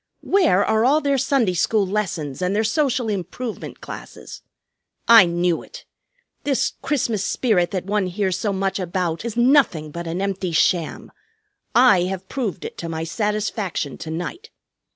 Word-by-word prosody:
Where 325 - +3
are 220 0 +2
all 280 +5 +4
their 280 -2 +1
Sunday 250 -7 +1
School 200 +4 +1
lessons 185 -8 -3
and 180 +2 0
their 215 - +2
social 250 0 0
improvement 210 +4 -5
classes? - - -9 0.7
I 230 -6 +8
knew 170 0 0
it! - - -12 0.6
This 280 -3 0
Christmas 235 -8 -1
spirit 195 -9 +1
that 185 -2 -3
one 205 -1 0
hears 190 0 -1
so 210 +1 -1
much 195 0 -1
about 175 -1 -2
is 235 -1 -5
nothing 240 - +3
but 170 +2 -6
an 165 +2 -3
empty 190 -3 -2
sham. 160 0 +1 0.6
I 235 -7 +6
have 190 0 -5
proved 210 -8 -4
it - - -8
to 170 - -5
my 160 0 -3
satisfaction 210 - -2
to 160 - -7
night. 175 - -5
195 Hz, 155 wpm, -22 LUFS, 175-235 Hz, 0.7 s, I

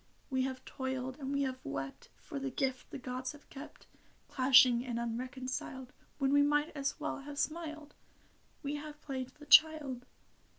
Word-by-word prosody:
We 260 0 +2
have 260 -1 -5
toiled 260 0 -4
and 270 -1 -3
we 280 0 +1
have 260 -1 -2
wept 135 0 -5
For 290 -4 -6
the 275 0 -2
gift 260 0 -2
the - - -6
gods 255 +1 -4
have 295 - -16
kept: 280 +2 -10 0.4
Clashing 255 -2 +6
and 245 -2 -3
unreconciled 255 +2 -4 0.2
When 275 -1 +2
we 285 - +7
might 295 +2 +2
as 275 -1 -2
well - - -2
have 285 +1 -8
smiled, 310 0 -3 0.7
We 290 +1 -2
have 300 0 -8
played 260 -3 -3
the 295 - -13
child. 290 -4 +5
270 Hz, 165 wpm, -33 LUFS, 255-290 Hz, 0.7 s, we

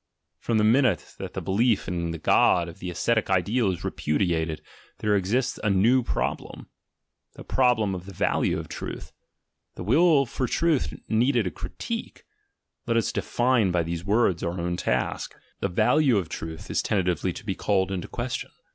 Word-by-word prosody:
From 115 - 0
the 105 - +3
minute 115 - +2
that - - -7
the - - -4
belief 105 +2 +1
in 85 -1 -2
the 85 - -4
God 85 +2 +3
of 85 - -10
the 90 - -5
ascetic 110 +6 0
ideal 100 +5 +2
is 90 - -6
repudiated, 80 -1 -1 0.3
there 105 -1 +1
exists 115 +8 0
a 105 - +2
ncd) 115 +6 +3
problem: - - -3 0.6
the - - -11
problem 120 -6 +2
of 90 0 -6
the - - -7
value 95 - 0
of - - -6
truth. - - -7 0.6
The - - -6
Will 145 - +4
for 130 +1 -2
Truth 165 -2 +1
needed 120 +1 +2
a 90 - -2
critique— - - -6 0.6
let 115 - +2
us 115 - +1
define 120 -4 +1
by 90 -1 +1
these 85 0 -4
rds 100 -3 +2
our 85 +1 -3
own 85 +1 -1
task - - -2
— - - -39
the - - +1
value 125 - +3
of 90 -5 -2
truth 80 0 -7
is - - +1
tentatively 90 -3 0
to 120 - -10
be 100 - -1
called 95 -1 0
in 95 -2 -2
question. 120 0 -4
100 Hz, 175 wpm, -26 LUFS, 90-120 Hz, 0.6 s, Will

